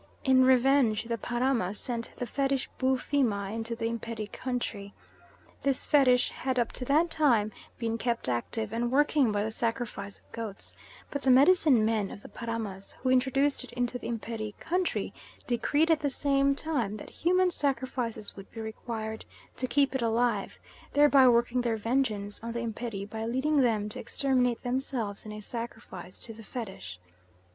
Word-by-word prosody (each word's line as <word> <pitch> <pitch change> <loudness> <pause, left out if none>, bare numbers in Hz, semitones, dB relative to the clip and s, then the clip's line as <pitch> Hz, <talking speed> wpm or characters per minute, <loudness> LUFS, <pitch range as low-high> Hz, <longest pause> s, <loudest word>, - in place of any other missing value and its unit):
In 260 -1 +5
revenge, 260 -3 +4
the 230 0 -2
Paramas 240 -5 0
sent 235 -2 -2
the 245 - -2
Fetish 270 +2 0
Boofima 255 -6 +1
into 225 +1 -2
the 225 - -3
Imperi 230 -2 -4
country. 230 -6 -4 0.7
This 275 -2 +1
Fetish 255 -4 +4
had 260 -1 -2
up 235 -1 +1
to 250 - -4
that 315 +6 +3
time 235 -9 +3 0.3
been 230 -1 -2
kept 235 - -1
active 205 - -2
and 235 +1 0
working 285 -3 +3
by 205 0 0
the 220 - -2
sacrifice 225 -3 -3
of - - -27
goats, 220 -4 -6 0.4
but 285 - -3
the 270 - +1
medicine 275 -3 +6
men 215 -3 +1
of 205 - -10
the - - -10
Paramas 225 -5 -5
who 255 - -1
introduced 270 +2 +2
it - - -11
into 245 0 -1
the - - -6
Imperi 220 -2 -4
country 360 +1 -1 0.3
decreed 290 +7 +2
at 320 - +4
the 290 - 0
same 275 0 +2
time 255 -10 -2
that - - -10
human 365 +1 +2
sacrifices 260 -7 -2
would 195 0 -11
be 225 - -9
required 220 0 -5 0.3
to 255 - -1
keep 275 +2 +2
it 265 - -1
alive, 230 -2 0 0.3
thereby 285 -2 +6
working 240 +1 +3
their 235 -2 0
vengeance 215 -3 -1
on 230 0 -4
the 235 - -2
Imperi 220 -3 -4
by 220 +1 -5
leading 265 +6 +2
them 220 -4 +2
to 210 - -6
exterminate 250 -3 0
themselves 245 -5 -2
in 210 0 -7
sacrifice 225 -6 -7
to 225 - -7
the 225 - -12
Fetish. 190 - -7
235 Hz, 165 wpm, -29 LUFS, 220-265 Hz, 0.7 s, medicine